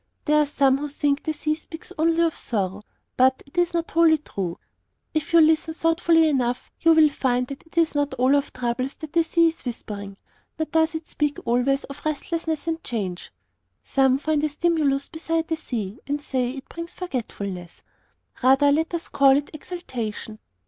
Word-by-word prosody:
There 300 Hz, 0 st, +4 dB
are 295 Hz, -, +1 dB
some 275 Hz, -2 st, +3 dB
who 295 Hz, -, -3 dB
think 285 Hz, 0 st, 0 dB
the 315 Hz, -, -2 dB
sea 305 Hz, 0 st, -1 dB
speaks 320 Hz, +3 st, -10 dB
only 330 Hz, +1 st, +2 dB
of 330 Hz, -2 st, +1 dB
sorrow, 195 Hz, -3 st, -2 dB, 0.4 s
but 260 Hz, +1 st, +3 dB
this 350 Hz, 0 st, +3 dB
is -, -, -12 dB
not 335 Hz, 0 st, -1 dB
wholly 330 Hz, -1 st, +5 dB
true. 190 Hz, -, -5 dB, 0.6 s
If 310 Hz, 0 st, -2 dB
you 335 Hz, -, +6 dB
will 320 Hz, -, +8 dB
listen 320 Hz, 0 st, +1 dB
thoughtfully 330 Hz, 0 st, +3 dB
enough, 250 Hz, -4 st, -1 dB
you 330 Hz, 0 st, +5 dB
will 310 Hz, -1 st, +6 dB
find 250 Hz, -3 st, 0 dB
that 275 Hz, -, -8 dB
it 325 Hz, -, -22 dB
is 330 Hz, -1 st, +3 dB
not 290 Hz, -2 st, 0 dB
all 260 Hz, +2 st, +3 dB
of 285 Hz, 0 st, 0 dB
troubles 250 Hz, +2 st, -2 dB
that 315 Hz, -1 st, -9 dB
the 335 Hz, -1 st, +4 dB
sea 335 Hz, 0 st, +3 dB
is 325 Hz, -, -10 dB
whispering. 205 Hz, -5 st, -6 dB, 0.4 s
Nor 315 Hz, -, 0 dB
does 320 Hz, 0 st, +2 dB
it 320 Hz, 0 st, -5 dB
speak 295 Hz, -1 st, -1 dB
always 250 Hz, +4 st, +2 dB
of 280 Hz, +1 st, -10 dB
restlessness 320 Hz, +1 st, -2 dB
and 330 Hz, 0 st, -2 dB
change. 195 Hz, -7 st, -4 dB, 0.5 s
Some 265 Hz, -1 st, +3 dB
find 300 Hz, +1 st, 0 dB
a 305 Hz, -, +2 dB
stimulus 295 Hz, -3 st, +1 dB
beside 325 Hz, 0 st, -2 dB
the 325 Hz, -, +1 dB
sea, 230 Hz, -7 st, -5 dB
and 290 Hz, +1 st, -1 dB
say 260 Hz, -4 st, -1 dB
it 265 Hz, +1 st, -8 dB
brings 335 Hz, +1 st, -8 dB
forgetfulness. 200 Hz, -, -5 dB, 0.6 s
Rather 270 Hz, +3 st, +5 dB
let 320 Hz, +4 st, +1 dB
us 335 Hz, -, -4 dB
call 275 Hz, -1 st, +5 dB
it 290 Hz, -, -4 dB
exaltation. 240 Hz, -, -6 dB
290 Hz, 190 wpm, -24 LUFS, 255-320 Hz, 0.6 s, will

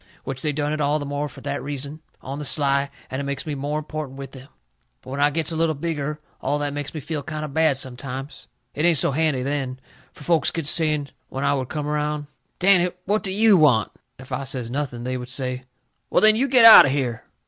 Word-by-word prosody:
Which 135 Hz, 0 st, -5 dB
they 150 Hz, -, 0 dB
done 145 Hz, +1 st, -2 dB
it 155 Hz, -, -2 dB
all 145 Hz, +1 st, +2 dB
the 145 Hz, -, -4 dB
more 145 Hz, +1 st, -3 dB
fur -, -, -13 dB
that 145 Hz, 0 st, -3 dB
reason, 145 Hz, +2 st, -5 dB, 0.2 s
on 135 Hz, +2 st, -6 dB
the -, -, -4 dB
sly, 140 Hz, -1 st, +2 dB, 0.2 s
and 130 Hz, +1 st, -3 dB
it -, -, -4 dB
makes 140 Hz, -1 st, -3 dB
me 155 Hz, -, -3 dB
more 145 Hz, +2 st, -3 dB
important 155 Hz, -3 st, -6 dB
with 135 Hz, -1 st, -8 dB
them. 130 Hz, 0 st, -12 dB, 0.6 s
But 130 Hz, -, -10 dB
when 140 Hz, -, -4 dB
I 145 Hz, +1 st, +4 dB
gets 160 Hz, +2 st, 0 dB
a -, -, -3 dB
little 160 Hz, -1 st, +1 dB
bigger, 150 Hz, -1 st, -3 dB, 0.2 s
all 145 Hz, +2 st, 0 dB
that 145 Hz, -1 st, -2 dB
makes 145 Hz, +2 st, -5 dB
me -, -, -3 dB
feel 150 Hz, +1 st, -4 dB
kind 155 Hz, 0 st, -5 dB
o' -, -, -5 dB
bad 155 Hz, -1 st, +2 dB
sometimes. 130 Hz, +1 st, -4 dB, 0.3 s
It 150 Hz, -, -2 dB
ain't 170 Hz, -2 st, +4 dB
so -, -, +1 dB
handy 145 Hz, -3 st, 0 dB
then. 135 Hz, -2 st, -3 dB, 0.3 s
Fur -, -, -14 dB
folks 165 Hz, +1 st, +2 dB
gets 160 Hz, -4 st, -1 dB
to -, -, +7 dB
saying, 150 Hz, -3 st, +1 dB, 0.2 s
when 135 Hz, -, -4 dB
I -, -, +2 dB
would 130 Hz, -3 st, -3 dB
come 150 Hz, -2 st, -3 dB
around: 150 Hz, 0 st, -2 dB, 0.3 s
"Danny, 180 Hz, -1 st, +4 dB, 0.2 s
what 210 Hz, +3 st, +1 dB
do 190 Hz, -, -3 dB
YOU 210 Hz, 0 st, +5 dB
want?" 130 Hz, -9 st, +3 dB, 0.3 s
And 130 Hz, -, -12 dB
if 130 Hz, -, -18 dB
I 130 Hz, +1 st, -2 dB
says, 125 Hz, -3 st, -3 dB
"Nothing," 130 Hz, -3 st, -3 dB
they 130 Hz, +1 st, -2 dB
would 125 Hz, 0 st, -7 dB
say: 130 Hz, -1 st, -2 dB, 0.5 s
"Well, -, -, +3 dB
then, 215 Hz, 0 st, +6 dB
you 260 Hz, +5 st, +1 dB
get 250 Hz, -3 st, +6 dB
out 225 Hz, -9 st, +11 dB
o' -, -, +1 dB
here!" 125 Hz, -5 st, -2 dB
145 Hz, 245 wpm, -23 LUFS, 135-155 Hz, 0.6 s, out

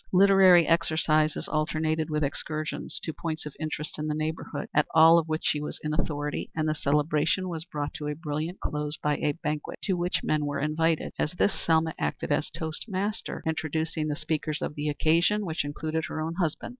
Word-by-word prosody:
Literary 190 Hz, -2 st, +7 dB
exercises 155 Hz, -2 st, +2 dB
alternated 155 Hz, +1 st, 0 dB
with 150 Hz, 0 st, 0 dB
excursions 150 Hz, +1 st, -3 dB
to 160 Hz, -, -3 dB
points 155 Hz, -1 st, -4 dB
of 150 Hz, -, -6 dB
interest 155 Hz, -1 st, -4 dB
in 150 Hz, -, -2 dB
the 150 Hz, -, -1 dB
neighborhood, 155 Hz, -1 st, -3 dB
at 150 Hz, -, +3 dB
all 165 Hz, +1 st, +8 dB
of 165 Hz, -, -3 dB
which 155 Hz, 0 st, -1 dB
she 150 Hz, -, +1 dB
was 150 Hz, -, -5 dB
in 150 Hz, 0 st, -1 dB
authority, 150 Hz, -2 st, -2 dB
and 155 Hz, -1 st, 0 dB
the 155 Hz, -, +2 dB
celebration 150 Hz, +4 st, +1 dB
was 165 Hz, -2 st, -5 dB
brought 145 Hz, -4 st, -4 dB
to 150 Hz, -, -5 dB
a 150 Hz, -, -2 dB
brilliant 155 Hz, +2 st, -4 dB
close 150 Hz, 0 st, -2 dB
by 150 Hz, -1 st, 0 dB
a 145 Hz, -, 0 dB
banquet, 150 Hz, -2 st, -4 dB
to 195 Hz, -, +1 dB
which 175 Hz, 0 st, 0 dB
men 150 Hz, -1 st, +1 dB
were 145 Hz, -1 st, -2 dB
invited. 160 Hz, +2 st, 0 dB
At 165 Hz, +4 st, -1 dB
this 200 Hz, -, +3 dB
Selma 160 Hz, -1 st, +1 dB
acted -, -, -2 dB
as 145 Hz, +1 st, +1 dB
toastmaster, 185 Hz, +6 st, -4 dB
introducing 160 Hz, 0 st, -1 dB
the 150 Hz, -, -1 dB
speakers 155 Hz, -1 st, -2 dB
of -, -, -2 dB
the 150 Hz, 0 st, -2 dB
occasion, 170 Hz, +8 st, +2 dB
which 160 Hz, -4 st, -1 dB
included 155 Hz, +2 st, -3 dB
her -, -, -5 dB
own 160 Hz, +1 st, -2 dB
husband. 165 Hz, -4 st, -1 dB
155 Hz, 195 wpm, -27 LUFS, 150-165 Hz, -, all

